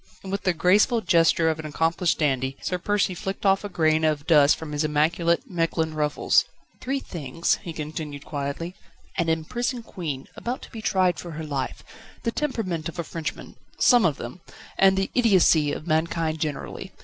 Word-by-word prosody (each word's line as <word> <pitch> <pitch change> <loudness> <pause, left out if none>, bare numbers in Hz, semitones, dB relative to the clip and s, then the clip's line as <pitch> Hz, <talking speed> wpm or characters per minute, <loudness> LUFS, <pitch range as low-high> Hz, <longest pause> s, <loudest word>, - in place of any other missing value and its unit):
And 190 - -6
with 200 - -3
the 185 - +3
graceful 205 +7 +3
gesture 165 -3 +3
of 160 -1 0
an 155 - -6
accomplished 165 +2 +1
dandy, 135 -3 0
Sir 180 - -1
Percy 205 0 +1
flicked 195 +3 -5
off 195 +1 +4
a 205 - -4
grain 160 -3 +2
of 150 -2 +1
dust 150 -3 +6
from 160 -2 -8
his 150 +1 -1
immaculate 165 - +2
Mechlin 165 -4 -1
ruffles. 150 -1 +2 0.4
"Three 270 +2 -1
things," 165 - -2
he 175 - -6
continued 150 -2 -6
quietly; 145 +4 -4 0.4
"an 170 -2 +1
imprisoned 240 - -1
Queen, 150 -10 -5
about 245 +2 -4
to - - -12
be 225 - -7
tried 185 -4 +2
for 170 -2 -7
her 160 +1 -5
life, 140 -3 -4 0.4
the 230 - 0
temperament 205 - -2
of 170 - -10
a 170 - -2
Frenchman 160 -2 -6 0.2
some 245 -2 +5
of 160 -6 +2
them 125 +10 -8 0.3
and 190 0 +4
the 195 - 0
idiocy 185 - +4
of - - -5
mankind 160 0 0
generally. 150 -2 -4
165 Hz, 180 wpm, -25 LUFS, 155-190 Hz, 0.4 s, dust